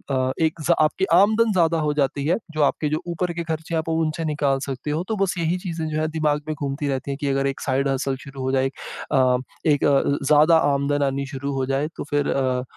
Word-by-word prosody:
अ, 130 0 +1
एक 160 +1 -2
ज़ - - +4
आपकी 155 +5 +2
आमदन 220 +3 +4
ज़्यादा 165 -3 +2
हो 150 -1 0
जाती 140 -1 0
है, 175 +5 +3
जो 155 -1 -2
आपके 150 +1 +1
जो 155 +1 -1
ऊपर 170 +1 -2
के 170 0 -3
खर्चे 160 0 -4
आप 160 0 -1
उनसे 160 0 -1
निकाल 145 -3 0
सकते 135 +2 -4
हो। 155 +4 -1
तो 220 - 0
बस 190 - -1
यही 170 +1 0
चीज़ें 170 -3 -4
जो 155 0 -2
है 155 - 0
दिमाग 150 -1 +1
में 155 - -2
घूमती 140 0 -3
रहती 135 0 -2
हैं 135 - -4
कि 145 - -1
अगर 135 0 +1
एक 135 - -3
साइड 135 +1 0
हसल 135 0 -1
शुरू 135 -1 -8
हो 130 0 -1
जाए 130 0 +2
एक 135 - -1 0.4
अ 130 -2 +4 0.3
एक 145 - +1
अ, 140 -2 +4 0.3
ज़्यादा 155 +3 +6 0.2
आमदन 140 +1 0
आनी 140 0 -1
शुरू 140 0 -4
हो 135 -1 -1
जाए। 135 +3 0
तो - - -4
फिर 145 -1 0
अ, 130 -2 0
145 Hz, 245 wpm, -23 LUFS, 135-160 Hz, 0.4 s, ज़्यादा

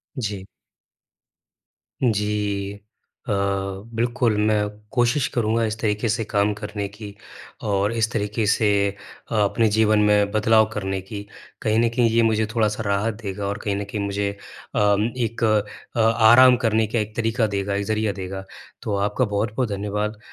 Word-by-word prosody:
जी। 105 -7 -4 1.6
जी। 105 -3 0 0.6
अ, - - +1 0.6
बिल्कुल 120 -1 +1
मैं 105 -1 +2 0.2
कोशिश 120 +1 +2
करूँगा 115 -1 0
इस 110 0 -3
तरीके 105 +1 0
से 115 +1 0
काम 105 -1 +1
करने 105 -1 -5
की, 100 0 -10 0.5
और 100 0 +1
इस 115 0 0
तरीके 105 0 -1
से 105 +1 +3 0.6
अपने 110 +1 +2
जीवन 110 0 +3
में 105 -1 +3
बदलाव 110 +1 +4
करने 95 -2 -2
की। 100 +2 -7 0.4
कहीं 110 +1 +2
न 115 0 +3
कहीं 120 -2 +3
ये 115 +1 +3
मुझे 110 -1 +2
थोड़ा 110 -2 +3
सा 115 - -3
राहत 100 +2 0
देगा 100 -1 -4
और 100 +1 -2
कहीं 100 -1 -1
न 100 - -2
कहीं 100 +1 -5
मुझे 100 0 -1 0.5
अ, - - +2 0.4
एक 115 -1 -2
अ, 110 +1 -1
आराम 115 +3 +6
करने 110 -2 +2
का 115 +1 -1
एक 105 0 -4
तरीका 115 0 +1
देगा 100 0 -1
एक 100 - -1
ज़रिया 110 -1 0
देगा। 95 +1 -5 0.4
तो 105 - -2
आपका 105 +6 +1
बहुत-बहुत 110 +3 -1
धन्यवाद, 105 +1 -2
110 Hz, 155 wpm, -23 LUFS, 100-115 Hz, 1.6 s, आराम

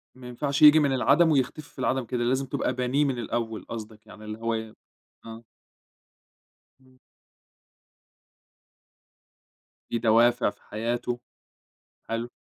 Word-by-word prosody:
ما 130 -1 -11
ينفعش 140 +4 -3
ييجي 150 +1 +9
من 140 -3 +2
العدَم 160 +5 +4
ويختفي 145 +2 -1
في - - -17
العدَم 130 -1 0
كده، 120 +1 -2
لازم 130 +3 0
تبقى 130 - -2
بانيه 130 +4 0
من 135 -3 -1
الأول 115 -1 -4
قصدك، 110 -1 -8
يعني 105 +1 -13
اللي 105 0 -6
هو 115 0 -1
ي 110 -1 -5 0.5
آه. 115 0 -10 1.4
إمم. 130 0 -24 2.9
في 115 - -1
دوافع 120 +2 +3
في - - -15
حياته، 120 +3 -3 0.9
حلو، 115 +1 -3
120 Hz, 125 wpm, -26 LUFS, 115-130 Hz, 2.9 s, ييجي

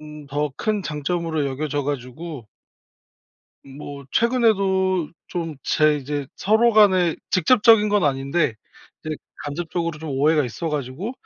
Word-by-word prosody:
음 150 -1 -11
더 145 +1 -2
큰 215 -2 -1
장점으로 160 -1 -2
여겨져 145 +1 -2
가지고 140 0 -5 1.2
뭐 140 +1 -9
최근에도 195 -7 +2 0.2
좀 165 -4 -4
제 155 -1 +3
이제 145 0 -4
서로 220 +4 +3
간에 185 -6 +4
직접적인 210 +3 +5
건 205 -3 +2
아닌데 140 0 0 0.5
이제 155 -1 -3 0.3
간접적으로 165 +2 -3
좀 160 -1 -6
오해가 150 +2 +2
있어 145 +7 -4
가지고 150 - -4
155 Hz, 265 characters per minute, -22 LUFS, 145-190 Hz, 1.2 s, 직접적인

